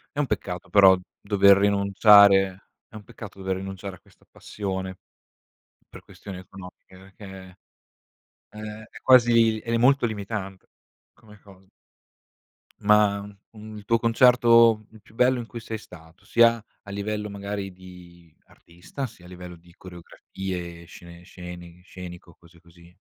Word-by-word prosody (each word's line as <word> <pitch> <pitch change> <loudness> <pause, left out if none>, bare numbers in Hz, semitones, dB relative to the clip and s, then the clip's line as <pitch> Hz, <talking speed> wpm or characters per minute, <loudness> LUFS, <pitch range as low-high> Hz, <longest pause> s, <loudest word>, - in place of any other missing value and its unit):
È - - -3
un 145 - 0
peccato 90 0 -5
però, 95 0 +6 0.2
dover 100 -1 +4
rinunciare 100 -1 +4 0.2
è - - -34
un 105 - -10
peccato 110 -4 -12
dover 95 0 -3
rinunciare 95 0 -7
a - - -20
questa - - -27
passione, 95 -2 -6 0.9
per - - -12
questioni 95 -3 -11
economiche, 95 0 -14
perché, 95 -1 -13 1.0
ehm, 105 0 -9
è - - -15
quasi 115 -3 +4
ed 115 - -6
è 115 - +1
molto 135 +1 +3
limitante 100 -3 -5 0.5
come 105 -1 -19
cosa. 95 -2 -19 1.2
Ma, 105 -1 +3 0.3
un 110 -1 -11
il 100 - -12
tuo 115 +2 +2
concerto 115 -2 +4
il 110 -1 -17
più 110 - -23
bello 125 +1 +2
in 115 - -6
cui 115 0 -9
sei 110 0 -6
stato? 85 -4 -17
Sia 115 -1 +3 0.2
a 100 - -12
livello, 105 +1 -4
magari, 100 -1 -6
di 90 -3 -16
artista, 90 +11 -9
sia 90 -5 -18
a - - -13
livello 90 -1 -11
di 85 +1 -21
coreografie, 90 -1 -9
scene 85 +1 -14
sceni 90 -1 -12
scenico, 90 -2 -12
cose 85 0 -21
così. 85 0 -20
100 Hz, 145 wpm, -24 LUFS, 90-110 Hz, 1.2 s, però